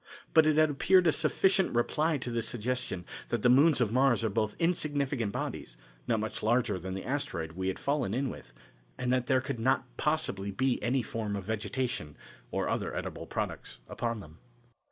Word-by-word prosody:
But 160 -1 +6
it 155 -1 +3
had 155 -1 +5
appeared 180 +6 +4
a 160 - +6
sufficient 190 - +2
reply 150 +6 +1
to 125 -2 -5
this 115 -1 -1
suggestion 120 -6 -3 0.2
that 120 -3 -1
the 125 - +5
moons 140 +4 +6
of 115 -4 +2
Mars 130 -2 +3
are 110 - 0
both 110 0 0
insignificant 145 - 0
bodies, - - -5 0.3
not 115 - +2
much 110 - -4
larger 115 -3 +1
than 95 +2 -5
the 95 - -6
asteroid 90 - -2
we 95 +3 -3
had 95 - -1
fallen 140 -7 -1
in 130 +3 -1
with, - - -11 0.5
and 125 0 0
that 125 -1 0
there 130 -1 +3
could 125 -2 -4
not 130 +3 +2
possibly 150 -11 -1
be 125 +6 0
any 125 +1 +1
form 110 -2 -3
of 100 - -4
vegetation 110 - -3 0.3
or - - -1
other - - -2
edible - - -5
products - - -4
upon 115 -2 -3
them. 80 -3 -14
120 Hz, 190 wpm, -30 LUFS, 105-140 Hz, 0.5 s, But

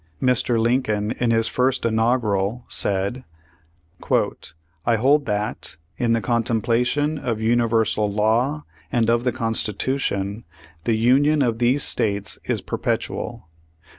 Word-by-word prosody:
Mr, 125 -1 +1
Lincoln, 110 -3 0
in 120 - +1
his 115 0 +3
first 130 +2 0
inaugural, 110 -1 0
said: 100 +6 0 1.6
'"I 115 - +2
hold 140 +6 +2
that, 105 -7 -3 0.2
in 115 -1 +1
the 115 - +1
contemplation 120 +7 0
of 115 -5 -2
universal 110 -2 +1
law 115 +8 +1 0.3
and 115 -1 +2
of 120 0 +1
the 125 - +2
Constitution, 115 -2 -2 0.4
the 115 -2 +1
Union 140 +6 +3
of 115 -3 -1
these 125 +4 +2
States 100 -2 +1
is - - -1
perpetual. - - -3
115 Hz, 115 wpm, -22 LUFS, 110-125 Hz, 1.6 s, his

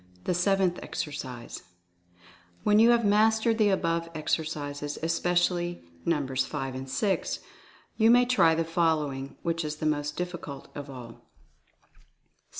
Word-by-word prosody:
THE - - 0
SEVENTH 185 0 +2
EXERCISE. 130 -5 -6 1.0
When 210 0 +4
you 230 +2 +7
have 235 -2 +4
mastered 220 +2 +3
the 210 -1 +5
above 165 -3 0
exercises, 145 -2 -2
espe 165 +2 0
cially 175 - 0 0.2
Nos. 135 -5 +1
5 135 -1 -4
and 130 +1 -6
6, 195 +7 0 0.6
you 225 0 +5
may 245 +1 +6
try 245 -10 +4
the 165 0 0
following, 155 -5 0
which 165 -1 -1
is 150 0 -3
the 155 - -5
most 150 -1 -1
difficult 170 -6 -6
of 145 -1 -7
all: 125 -3 -8
7. - - -18
165 Hz, 140 wpm, -28 LUFS, 145-190 Hz, 1.0 s, you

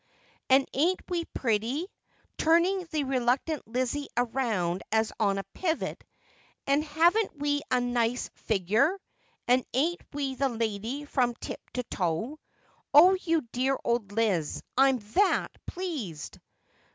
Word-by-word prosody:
And 265 +1 +5
ain't 340 +7 +2
we 345 -2 -1
pretty? 235 - -1 0.3
' - - -38
turning 345 +3 +3
the 310 -3 -1
reluctant 260 +3 0
Lizzie 255 +4 -2 0.2
round 190 -9 0
as 220 0 +2
on 200 -3 +2
a 195 - -2
pivot, 330 -3 -2 0.6
'and 280 +2 +2
haven't 335 +5 +2
we 290 0 0
a 255 - +3
nice 245 0 0
figure 215 - +2
1 395 - -11 0.5
And 250 +1 +4
ain't 330 +7 +1
we 280 -2 -2
the 270 +1 0
lady 230 +4 -3
from 250 -4 +1
tip - - -7
to 250 - -1
toe? 200 - -2 0.6
Oh, 350 +6 +9
you 330 -4 +1
dear 265 +2 +1
old 235 -4 0
Liz, 205 -8 0
I'm 270 0 +5 0.2
that 400 0 +3 0.2
pleased 285 - -5
265 Hz, 135 wpm, -28 LUFS, 225-310 Hz, 0.6 s, Oh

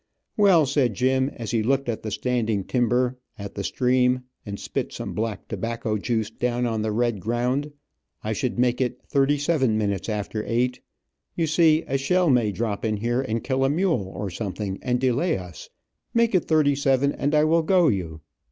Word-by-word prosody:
"Well," 190 -7 +5
said 130 -5 +1
Jim, 130 +2 +2
as 115 -2 -5
he 115 - +1
looked 135 +4 +1
at 115 -2 -2
the 110 - -4
standing 110 -2 -1
timber, 125 +2 +1 0.2
at 100 -1 -7
the 100 - -4
stream, 125 +2 +2 0.2
and 100 0 -5
spit - - -3
some - - -6
black 110 -3 -3
tobacco 115 -2 -3
juice 110 0 -1
down 120 +1 -1
on 110 -2 -1
the 110 0 -1
red 120 -1 0
ground, 125 +7 -1 0.5
"I 110 - -1
should 125 +3 -2
make 125 +1 +2
it 125 -1 -1
thirty 140 0 +2
seven 140 -7 +1
minutes 100 -1 -1
after 105 0 -3
eight. 125 +2 0 0.5
You 165 - +1
see, 160 0 +4
a 135 +1 -1
shell 180 +4 +2
may 120 -5 +3
drop 100 0 -3
in 110 -2 0
here 120 +4 0
and 115 -3 -3
kill 135 -1 0
a 135 - +3
mule, 150 - 0
or 100 -2 -4
something, 100 0 -4
and 125 -1 0
delay 130 +7 +1
us. 90 -5 -10 0.5
Make 230 -1 +3
it 185 - +2
thirty 155 -3 +3
seven, 140 0 +2
and 145 +2 -1
I 150 - +5
will 165 +2 +3
go 175 +1 +3
you." 85 - -2
125 Hz, 190 wpm, -24 LUFS, 110-140 Hz, 0.5 s, Well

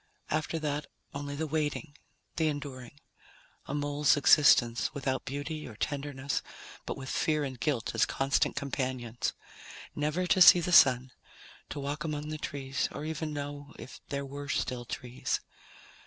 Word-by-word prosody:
After 155 +2 0
that, 150 -2 -2 0.3
only 145 0 -4
the 160 +2 -2
waiting, 150 0 -2 0.4
the 160 -1 +2
enduring. 140 -3 -5 0.7
A 140 - -3
mole's 145 0 +2
existence, 125 -4 +5
without 135 -2 -2
beauty 145 +3 -4
or 115 - -10
tenderness, 140 +2 -2 0.5
but - - -3
with 135 -1 -7
fear 155 +2 +1
and 130 -3 -5
guilt 120 -1 -1
as - - +3
constant 135 +1 +1
companions. 130 -4 -2 0.6
Never 150 +5 0
to 185 +1 +3
see 175 +1 +10
the 175 +1 -2
Sun, 130 -5 +6 0.6
to - - -5
walk 145 +2 -3
among 150 -1 -3
the 155 0 -4
trees 140 0 -2
or 150 - -6
even 160 0 -3
know 145 -1 -6
if - - -10
there 140 0 -2
were 140 +1 -7
still 125 -3 -1
trees. 125 +1 -3
145 Hz, 150 wpm, -30 LUFS, 135-150 Hz, 0.7 s, see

